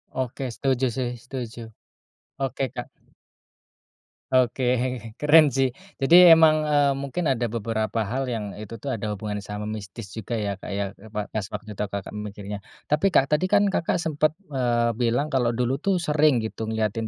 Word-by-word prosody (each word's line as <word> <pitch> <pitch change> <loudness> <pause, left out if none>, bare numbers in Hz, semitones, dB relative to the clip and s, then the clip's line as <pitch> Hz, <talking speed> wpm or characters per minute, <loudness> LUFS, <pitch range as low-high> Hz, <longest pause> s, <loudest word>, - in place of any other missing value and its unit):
Oke 130 +1 -3
setuju 135 -1 +1
sih, 125 -2 -1
setuju. 120 -2 -6 0.8
Oke, 135 0 -1
kak. - - -5 1.5
Oke, 130 0 +2 0.6
keren 155 +1 +7
sih 135 -1 +3 0.3
jadi 170 +3 +9
emang, 160 -1 +6
eee, 145 -1 +3
mungkin 140 +6 -3
ada 120 -2 0
beberapa 115 0 -2
hal 135 0 -1
yang 115 -4 -3
itu 110 +2 -7
tuh 130 +5 -5
ada 110 -3 -3
hubungannya 105 0 -4
sama 105 +1 -6
mistis 100 0 -9
juga 110 +2 -4
ya, 105 -2 -1
Kak, - - -9
ya, 100 - 0 0.2
e 110 - -13
pa 105 -1 -3
pas 105 -3 -2
waktu 110 - -6
itu, 105 0 -3
Kakak, 100 0 -6
mikirnya. 105 -1 -6 0.3
Tapi 150 +6 +3
Kak 140 -7 +3
tadi 150 +5 +3
kan 205 +1 +4
Kakak 170 - 0
sempat, 155 0 +1 0.2
eee, 120 -3 +1
bilang 120 +5 +1
kalau 120 -3 +1
dulu 125 +3 0
tuh 195 +2 +1
sering 150 -6 +3
gitu 110 0 -5
ngeliatin, 110 0 -1
120 Hz, 170 wpm, -25 LUFS, 110-140 Hz, 1.5 s, jadi